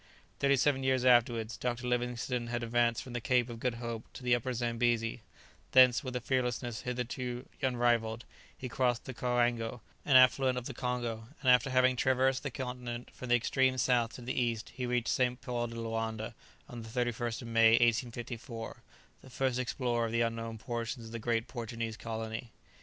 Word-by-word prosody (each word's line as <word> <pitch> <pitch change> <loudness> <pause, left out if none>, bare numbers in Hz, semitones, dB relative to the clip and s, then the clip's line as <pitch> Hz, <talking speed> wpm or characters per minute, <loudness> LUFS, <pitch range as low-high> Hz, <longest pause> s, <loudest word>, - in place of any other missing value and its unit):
Thirty 140 0 +4
seven 135 0 +2
years 130 -1 +1
afterwards, 120 -2 +3
Dr. 125 0 -2
Livingstone 125 0 -1
had 120 0 -2
advanced 120 0 +1
from 125 - -9
the 120 - -3
Cape 125 -1 +2
of 115 - -8
Good 125 0 -1
Hope 115 -1 -6
to - - -10
the 125 0 +3
Upper 120 +1 0
Zambesi; 120 -1 0 0.5
thence, 125 -2 +7
with 130 -2 -5
a - - 0
fearlessness 120 -2 -1
hitherto 125 0 -4
unrivalled, 120 -3 +1 0.3
he 130 - -5
crossed 125 -1 0
the 130 - -6
Coango, 120 -1 0 0.2
an 140 - +3
affluent 130 0 +6
of 125 - -4
the 135 - -5
Congo, 120 -3 -3
and 130 - +5
after 125 +1 +4
having 130 0 +4
traversed 130 +1 +2
the 145 - -3
continent 125 -2 -5
from 125 - -8
the 120 - +6
extreme 130 +2 +2
south 120 -2 +2
to - - -9
the 125 - -3
east 115 -3 -1
he 125 -1 -3
reached 120 -1 0
St. 125 -1 +1
Paul 120 -1 -2
de 115 - -8
Loanda 115 0 -3 0.3
on 120 -1 -8
the 115 - -9
31st 120 -1 -2
of 115 - -7
May, 115 -1 +6
1854, 120 0 0 0.4
the 130 - -14
first 130 0 0
explorer 120 -2 0
of - - -5
the 115 0 +1
unknown 115 -1 -2
portions 115 +1 -4
of 110 - -10
the 115 - -5
great 115 0 0
Portuguese 115 -2 -4
colony. 110 0 -5
120 Hz, 185 wpm, -32 LUFS, 115-125 Hz, 0.5 s, thence